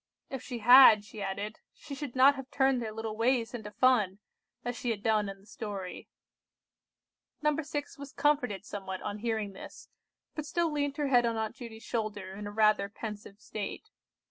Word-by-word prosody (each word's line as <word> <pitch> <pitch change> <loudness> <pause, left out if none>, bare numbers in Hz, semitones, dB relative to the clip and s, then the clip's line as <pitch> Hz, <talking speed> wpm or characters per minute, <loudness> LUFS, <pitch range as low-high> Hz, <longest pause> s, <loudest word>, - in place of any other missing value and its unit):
If 265 -3 -4
she 245 - -6
had, 245 -4 +9
she 210 0 -9
added, 200 +2 -4 0.2
she 285 - -10
should 280 -3 -6
not 265 +2 +7
have 270 -2 -8
turned 265 -2 +2
their 220 -2 -4
little 220 0 -5
ways 235 +1 +1
into 220 -4 -6
fun, 210 -4 +3 0.5
as 245 0 -2
she 245 - -3
had 210 -3 -2
done 215 -2 +2
in 195 0 -8
the 195 - -21
story. 205 -5 -7 1.3
No. 300 0 +3
6 290 -2 -5
was 280 -1 -8
comforted 250 -10 +1
somewhat 190 -3 -6
on 205 - -4
hearing 220 -3 -2
this, - - -11 0.4
but 305 -1 -5
still 335 +1 0
leant 285 -1 -1
her 290 -2 0
head 245 -2 +5
on 230 -1 -1
Aunt 220 +1 -2
Judy's 230 -3 -10
shoulder 210 -5 -3
in 205 +1 -6
a - - -6
rather 215 -2 +3
pensive 210 -1 -8
state. 210 -2 -6
225 Hz, 185 wpm, -30 LUFS, 205-265 Hz, 1.3 s, had